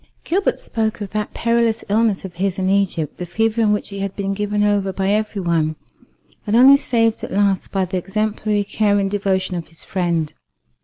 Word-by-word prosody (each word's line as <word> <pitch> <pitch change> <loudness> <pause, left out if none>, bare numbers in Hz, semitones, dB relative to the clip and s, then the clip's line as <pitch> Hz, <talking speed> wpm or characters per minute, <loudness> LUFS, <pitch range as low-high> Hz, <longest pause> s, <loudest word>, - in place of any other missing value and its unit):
Gilbert 385 +4 0
spoke 220 -2 -2
of 205 -2 -6
that 210 -1 -2
perilous 230 -1 +1
illness 210 -2 +1
of 185 - -8
his 185 +1 -1
in 190 0 +1
Egypt, 185 -6 0
the 180 - -3
fever 225 +4 0
in 215 -2 +3
which 210 - -1
he 200 -1 -7
had 195 0 -3
been 195 -1 -2
given 205 +1 -1
over 205 -2 +1
by 190 +1 -1
every 210 -1 0
one, 160 -2 +1 0.7
and 210 - +1
only 260 +4 +8
saved 230 -5 +1
at - - -5
last 200 -1 +1
by 190 -1 0
the 185 +1 -3
exemplary 210 +2 -1
care 205 0 +1
and 195 -1 0
devotion 190 -2 0
of 170 -2 -5
his 165 - -8
friend. 170 -4 -1
200 Hz, 200 wpm, -20 LUFS, 190-215 Hz, 0.7 s, only